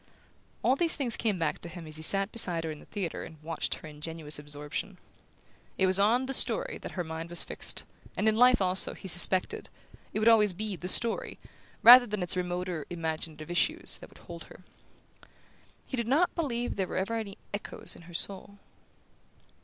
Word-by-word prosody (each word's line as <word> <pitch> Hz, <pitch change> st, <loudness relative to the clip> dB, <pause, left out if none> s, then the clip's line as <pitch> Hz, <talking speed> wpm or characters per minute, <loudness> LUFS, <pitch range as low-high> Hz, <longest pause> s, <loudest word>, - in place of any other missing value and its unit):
All 260 Hz, -, +3 dB
these 330 Hz, +3 st, +2 dB
things 250 Hz, -5 st, 0 dB
came 215 Hz, -4 st, -1 dB
back 165 Hz, -3 st, -2 dB
to 170 Hz, -, -9 dB
him 170 Hz, -1 st, -9 dB
as 155 Hz, 0 st, -4 dB
he -, -, -7 dB
sat 195 Hz, +5 st, +6 dB
beside 175 Hz, -7 st, +1 dB
her 160 Hz, -, -4 dB
in 150 Hz, -, -9 dB
the -, -, -17 dB
theatre 190 Hz, -6 st, -5 dB
and 160 Hz, -1 st, -12 dB
watched 165 Hz, 0 st, -2 dB
her -, -, -11 dB
ingenuous 150 Hz, 0 st, -5 dB
absorption. 150 Hz, +6 st, -6 dB, 0.8 s
It 190 Hz, -, +3 dB
was 190 Hz, +1 st, +5 dB
on 230 Hz, +6 st, +3 dB
"the 270 Hz, -, -3 dB
story" -, -, +1 dB
that -, -, -8 dB
her 180 Hz, -, -3 dB
mind 160 Hz, +1 st, -7 dB
was 175 Hz, -, +1 dB
fixed, -, -, -3 dB, 0.3 s
and 215 Hz, -, +1 dB
in 215 Hz, -, +3 dB
life 245 Hz, -2 st, +5 dB
also, 185 Hz, +1 st, +2 dB
he 195 Hz, -, -10 dB
suspected, 180 Hz, +1 st, +2 dB, 0.4 s
it -, -, -4 dB
would 215 Hz, +1 st, +1 dB
always 210 Hz, -4 st, +5 dB
be 210 Hz, +2 st, -4 dB
"the 180 Hz, +1 st, -7 dB
story", 230 Hz, +5 st, +1 dB, 0.5 s
rather 245 Hz, +1 st, +10 dB
than 210 Hz, -3 st, -3 dB
its 180 Hz, -, +3 dB
remoter 180 Hz, -3 st, -3 dB
imaginative 160 Hz, -1 st, -5 dB
issues, 310 Hz, -, +2 dB
that -, -, -12 dB
would -, -, -18 dB
hold 170 Hz, -2 st, -11 dB
her. -, -, -15 dB, 1.2 s
He -, -, -5 dB
did 235 Hz, -2 st, -2 dB
not 305 Hz, +8 st, +2 dB
believe 245 Hz, -10 st, -3 dB
there 190 Hz, -2 st, -1 dB
were -, -, -5 dB
ever 195 Hz, +5 st, -2 dB
any 215 Hz, -3 st, -5 dB, 0.2 s
echoes 205 Hz, -, -2 dB
in -, -, -14 dB
her -, -, -12 dB
soul... 200 Hz, +2 st, -4 dB
185 Hz, 195 wpm, -29 LUFS, 165-225 Hz, 1.2 s, rather